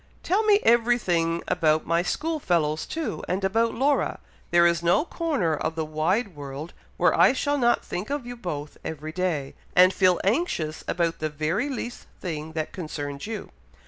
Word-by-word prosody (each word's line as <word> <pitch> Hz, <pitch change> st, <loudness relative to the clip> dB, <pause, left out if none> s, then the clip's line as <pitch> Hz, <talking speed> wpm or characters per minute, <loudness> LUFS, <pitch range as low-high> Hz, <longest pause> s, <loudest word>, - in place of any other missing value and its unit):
Tell 385 Hz, +5 st, +2 dB
me 420 Hz, -2 st, +5 dB
everything 215 Hz, -9 st, +2 dB
about 155 Hz, -3 st, +2 dB
my 170 Hz, +1 st, +2 dB
school 315 Hz, -, -2 dB
fellows, 155 Hz, -, 0 dB
too, 320 Hz, -1 st, -4 dB
and 185 Hz, +3 st, -1 dB
about 225 Hz, +4 st, +1 dB
Laura. 275 Hz, +3 st, +1 dB, 0.3 s
There 170 Hz, 0 st, +5 dB
is 170 Hz, -1 st, +3 dB
no 175 Hz, -, +3 dB
corner 285 Hz, -, 0 dB
of 160 Hz, -, -3 dB
the 160 Hz, -1 st, -2 dB
wide 170 Hz, +6 st, 0 dB
world 145 Hz, +3 st, -7 dB, 0.2 s
where -, -, +4 dB
I -, -, +6 dB
shall 285 Hz, +2 st, 0 dB
not 240 Hz, -1 st, +2 dB
think 180 Hz, +7 st, -4 dB
of 285 Hz, -3 st, -2 dB
you 245 Hz, 0 st, -6 dB
both 155 Hz, -9 st, -6 dB
every 155 Hz, -1 st, -5 dB
day, 160 Hz, -6 st, -2 dB, 0.2 s
and 185 Hz, +1 st, +7 dB
feel 185 Hz, -2 st, +3 dB
anxious 195 Hz, -, 0 dB
about 170 Hz, -1 st, 0 dB
the 155 Hz, -, -1 dB
very 155 Hz, -, -1 dB
least 245 Hz, -2 st, -5 dB
thing 160 Hz, -3 st, -5 dB
that 155 Hz, -1 st, -3 dB
concerns 145 Hz, -3 st, -5 dB
you." 220 Hz, -2 st, -6 dB
180 Hz, 175 wpm, -25 LUFS, 155-240 Hz, 0.3 s, and